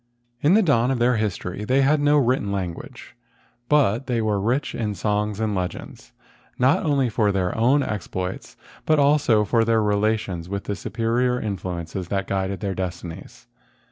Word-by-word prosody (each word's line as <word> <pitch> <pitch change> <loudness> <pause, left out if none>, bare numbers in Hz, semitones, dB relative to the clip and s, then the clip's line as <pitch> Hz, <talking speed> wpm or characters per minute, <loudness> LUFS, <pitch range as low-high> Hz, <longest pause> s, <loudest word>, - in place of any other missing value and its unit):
In 160 +7 +4
the 220 - +5
dawn 125 -7 +2
of 135 - 0
their 120 0 +2
history 100 -2 -3
they 130 +5 +2
had 150 +3 +3
no 145 +1 +4
written 125 -6 +1
language, 95 -4 -6 0.5
but 135 -4 +2
they 120 -3 0
were 105 -2 0
rich 125 +7 -1
in 105 -3 -3
songs 105 0 -1
and 110 -1 -1
legends, 90 -2 -5 0.5
not 130 +2 +3
only 140 -4 +2
of 105 -3 +2
their 90 -2 0
own 130 +6 +3
exploits, 95 -2 -5 0.3
but 155 - +4
also 140 -6 +3
of 115 +2 +2
their 115 -1 +3
relations 105 -4 -1
with 100 0 -3
the 100 - -3
superior 120 +4 -1
influ¬ 95 -4 -4
ences 85 +2 -6
that 95 +1 -2
guided 95 0 -2
their 100 -2 -2
destinies. 90 +5 -7
110 Hz, 170 wpm, -23 LUFS, 95-125 Hz, 0.5 s, the